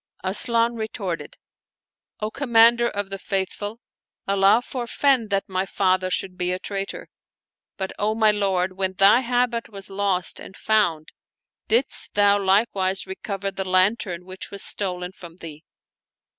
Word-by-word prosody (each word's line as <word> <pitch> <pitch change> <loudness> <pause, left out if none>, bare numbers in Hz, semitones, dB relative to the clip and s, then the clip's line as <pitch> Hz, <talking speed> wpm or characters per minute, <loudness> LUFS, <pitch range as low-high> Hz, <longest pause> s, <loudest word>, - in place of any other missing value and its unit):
Asian 230 +4 +3
retorted, 215 -6 -5 0.4
" - - -68
O 215 +1 -2
Commander 235 -2 +4
of 200 -1 -4
the 195 - -5
Faithful, 205 +3 -3 0.5
Allah 200 +4 +4
forfend 250 -1 0
that 195 -1 +1
my 185 0 -1
father 185 -1 0
should 185 0 -3
be 180 0 0
a 180 - -1
traitor! 195 +1 -5 0.7
But, 190 -1 -3
O 215 +1 0
my 220 -1 +4
lord, 190 -3 0
when 190 -1 0
thy 195 +5 +6
habit 245 -1 -1
was 195 -2 -9
lost 195 -2 -1
and 190 - -11
found, 175 -8 +1 0.6
didst 240 +5 +1
thou 205 0 +4
like 195 +4 +3
wise 190 0 -1
recover 195 +1 -5
the 195 0 -4
lantern 185 -1 +1
which 185 0 -8
was 200 - -4
stolen 180 -2 -1
from 170 -3 -13
thee?" 160 -3 -10
195 Hz, 145 wpm, -23 LUFS, 185-220 Hz, 0.7 s, thy